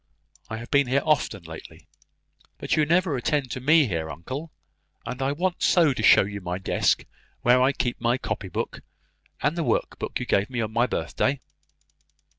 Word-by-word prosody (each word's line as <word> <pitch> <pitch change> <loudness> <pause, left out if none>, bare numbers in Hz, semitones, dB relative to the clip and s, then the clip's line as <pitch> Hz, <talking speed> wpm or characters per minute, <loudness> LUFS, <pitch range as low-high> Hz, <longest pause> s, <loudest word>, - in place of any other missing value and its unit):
I 110 - -4
have 115 +1 -9
been 140 -2 +4
here 135 +3 +1
often 140 - +1
lately." 80 -1 -11 0.7
"But - - -1
you 155 -1 +2
never 170 -1 +2
attend 130 0 -1
to 130 - -3
me 155 +4 +5
here, 80 -7 -3
uncle! 130 - -6 0.5
And 125 +2 -5
I 135 +1 +1
want 175 +4 -2
so 165 -6 +4
to - - -4
show - - +7
you 100 +1 -6
my 90 0 -3
desk, 95 - +1 0.4
where 125 +1 +5
I 130 +2 +4
keep 125 -4 -3
my 120 +1 +2
copy 110 -6 -4
book, - - -4 0.6
and 145 +3 +1
the 170 - -1
work - - -1
box - - -4
you - - -3
gave 100 +1 +1
me 125 -2 -4
on 110 -1 -2
my 120 +2 +2
birthday." 135 +1 -1
130 Hz, 190 wpm, -25 LUFS, 110-145 Hz, 0.7 s, show